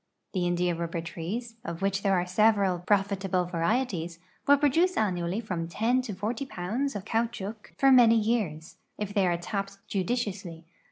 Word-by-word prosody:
The 180 -3 0
india 175 0 +1
rul)l)er 170 0 -4
trees, 225 +9 -5
of 170 +2 -5
which 195 0 +1
there 195 -1 +2
are 175 - -1
several 200 -1 +3
prolitahle 195 -3 +1
varieties, 175 -1 -1 0.3
will 285 0 +7
produce 325 +6 +2
annually 185 0 0
iVom 175 -6 -3
10 230 +8 +1
to 225 -6 -6
10 225 +8 -3
pounds 235 +8 -2
of 200 -1 -5
caout 230 +1 0
chouc 210 0 -7
for 270 0 +5
many 240 -3 +7
years, 210 -8 -1 0.2
if 205 -1 -4
they 200 -3 +3
are 175 -1 +1
tapped 195 +3 -4
judiciously. 190 -5 -3
200 Hz, 165 wpm, -28 LUFS, 175-230 Hz, 0.3 s, will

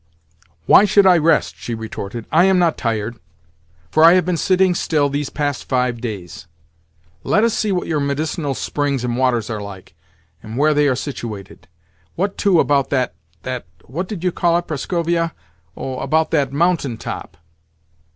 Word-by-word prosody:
"Why - - +7
should 200 0 +4
I 180 -3 +6
rest?" 160 +1 +2
she 120 - -5
retorted. 110 0 -6
"I 170 +3 +5
am 190 -1 +4
not 170 -3 +2
tired, 115 0 -2 0.7
for 155 - +4
I 165 +1 +9
have 185 -2 +3
been 180 -1 0
sitting 185 +1 +2
still 150 -4 +1
these 145 0 -2
past 145 -2 -3
five 125 -3 0
days. 90 -8 -7 0.8
Let 210 - +2
us 230 -1 +2
see 215 - 0
what 180 -2 -1
your 155 -2 -1
medicinal 145 +1 -2
springs 140 -3 -2
and 120 -1 -1
waters 125 -3 +1
are 110 -2 -4
like, 95 -4 -10 0.5
and 110 +2 -8
where 150 +2 +3
they 145 0 +3
are 130 - +2
situated. 115 -8 -7 0.5
What, 195 +3 -1
too, 190 -5 +3
about 140 -3 +2
that, 130 -3 0 0.3
that—what 125 - -6
did 185 -4 -6
you 180 - +1
call 170 0 +2
it, 175 - -3
Prascovia?—oh, 135 - -4
about 160 +1 +1
that 140 -5 +1
mountain 150 -5 0
top?" - - -7
145 Hz, 165 wpm, -19 LUFS, 120-170 Hz, 0.8 s, I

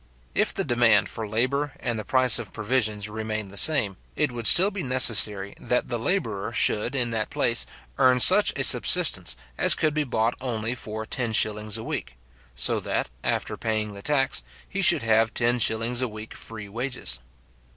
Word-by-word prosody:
If - - 0
the - - -3
demand 120 -4 +2
for 110 -2 -6
labour 130 +7 -1
and 120 -2 -3
the - - -5
price 130 -1 +3
of 115 -5 -8
provisions 110 -2 -2
remained 110 -1 -5
the - - -13
same, 105 -7 +4 0.2
it 150 -3 0
would 120 -2 -1
still 190 +4 +7
be 200 -1 -5
necessary 110 - +4
that 125 - -2
the 120 -1 -3
labourer 115 - -2
should, 115 +3 0
in 120 -3 +1
that 110 -1 -3
place, - - +1 0.3
earn 125 -1 +4
such 120 - +6
a - - -1
subsistence - - +2 0.2
as - - +5
could 155 -2 -1
be 150 0 0
bought 115 -3 -1
only 115 -2 -3
for 110 -2 -7
ten 115 -1 -3
shillings 105 0 0
a 110 - -8
week; 60 - -6 0.4
so - - 0
that, - - -3
after - - -3
paying 110 -2 -3
the 100 - -11
tax, 135 - 0 0.3
he - - -4
should - - +3
have 115 0 +1
ten 120 +1 +1
shillings 115 +3 +1
a 130 - 0
week 110 0 -10
free 110 -2 -9
wages. 115 - -3
115 Hz, 180 wpm, -24 LUFS, 110-125 Hz, 0.4 s, still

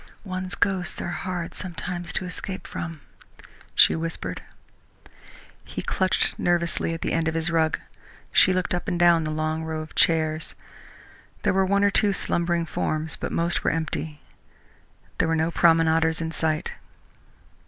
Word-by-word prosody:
"One's 185 -2 -4
ghosts 185 -4 0
are - - -3
hard 175 -2 -4
sometimes 175 -1 -5
to 185 - 0
escape 190 +1 -6
from," 165 -3 -6 0.7
she - - +6
whispered. 160 - -4 1.2
He - - -6
clutched 185 0 +1
nervously 170 -1 0
at 165 - -6
the - - -1
end 165 -1 +1
of 160 - -1
his 165 +1 0
rug. 160 -1 +2 0.5
She 185 - +6
looked 185 -1 0
up 175 - -2
and 175 -3 -1
down 170 -2 +5
along 155 +1 -1
the 160 - -5
row 160 -1 -3
of 155 - -10
chairs. 155 -1 +2 0.9
There - - +3
were 190 0 +3
one 200 +1 +3
or 200 - +4
two 205 0 +3
slumbering 170 -2 0
forms, 155 0 -2
but - - -5
most 170 +1 0
were - - +3
empty. 160 -1 -3 1.0
There - - +3
were 165 - +2
no 160 +1 +1
promenaders 165 -1 +4
in 160 -1 -3
sight. 160 -1 -1
165 Hz, 155 wpm, -25 LUFS, 160-180 Hz, 1.2 s, she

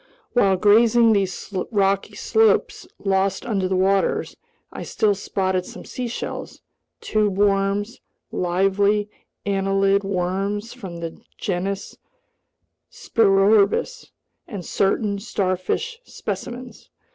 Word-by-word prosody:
While 195 -6 +4
grazing 225 +3 +5
these 195 0 -2 0.2
rocky 195 -2 +1
slopes 445 0 +2 0.2
lost 195 0 +1
under 200 -5 0
the 190 - 0
waters, 195 +1 +1 0.4
I - - -6
still 215 -2 +1
spotted 190 -2 -1
some - - -10
seashells, 245 -2 -5 0.4
tube 210 -3 0
worms, 200 +2 +1 0.3
lively 200 +3 +1 0.3
annelid 195 0 +2
worms 195 +3 -2
from 190 -9 -8
the 165 -1 -6 0.2
genus 195 +1 -3 0.9
Spirorbis, 210 - +2 0.4
and 195 -7 -7
certain 200 +1 0
starfish 200 - -2
specimens. 250 - -7
200 Hz, 95 wpm, -22 LUFS, 190-215 Hz, 0.9 s, grazing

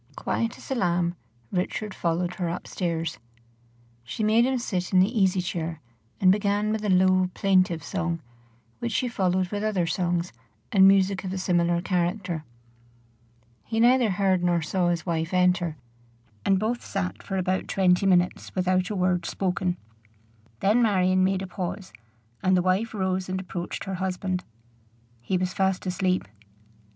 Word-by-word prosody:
Quiet 230 0 -2
as - - -11
a - - +3
lamb 175 -6 0 0.4
Richard 190 +3 -2
followed 175 +1 -1
her 175 -2 -1
up 170 - -5
stairs. 165 -2 -3 0.8
She 125 - -4
made 225 +3 +4
him 265 -1 +1
sit 185 -7 -3
in 185 - +5
the 200 +7 +3
easy 190 -3 +3
chair, 165 -2 -3 0.4
and 185 -1 +6
began 205 +1 +1
with 215 -1 -2
a 210 - -1
low, 185 0 +4
plaintive 185 -5 +2
song, 170 -3 -2 0.6
which 115 - -3
she 255 - 0
followed 185 -5 0
with 205 -1 -2
other 205 -5 +1
songs 175 0 -1 0.4
and 190 -2 +7
music 195 0 +3
of 185 - -4
a 190 - -3
similar 175 -2 +1
character. 180 -2 -1 1.2
He 225 0 -2
neither 245 0 +5
heard 190 -2 +1
nor 175 -2 +2
saw 180 +3 0
his 170 -1 -1
wife 165 0 -1
enter, 180 -3 +2 0.7
and 195 - +3
both 230 +4 -1
sat 190 -2 -3
for 195 - -4
about 185 0 -1
twenty 185 0 +2
minutes 180 -1 +1
without 185 0 +1
a 210 - -3
word 180 -2 +1
spoken. 180 -1 -1 0.8
Then 215 +5 +3
Marion 185 -4 +3
made 190 0 +1
a - - -5
pause, 185 - -5 0.5
and 185 0 +3
the 180 - +2
wife 195 +5 0
rose 190 -1 -1
and 185 0 -2
approached 180 -2 -5
her 195 - -5
husband. 185 0 -2 0.8
He 185 +10 -1
was 185 0 -2
fast 190 -1 0
asleep. 185 - 0
185 Hz, 160 wpm, -26 LUFS, 175-195 Hz, 1.2 s, and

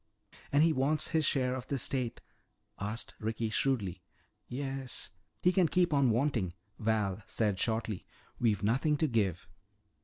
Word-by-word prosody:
"And 145 +2 +5
he 165 -1 +4
wants 150 +3 +1
his 160 -2 +2
share 125 -2 +2
of 130 -1 -5
the 140 - -1
estate?" 130 -2 -2 0.6
asked 105 +3 -4
Ricky 110 0 -2
shrewdly. 100 -10 0 0.5
"Yes." 135 -1 -3 0.3
"He 180 - +6
can 185 -2 +4
keep 175 -1 +2
on 140 -3 +4
wanting," 115 -6 +1 0.3
Val 105 -3 0
said 105 -4 +1
shortly. 110 -3 -1 0.3
"We've 110 -4 +2
nothing 135 +8 +2
to 160 - +2
give." 100 - 0
120 Hz, 145 wpm, -32 LUFS, 110-140 Hz, 0.6 s, He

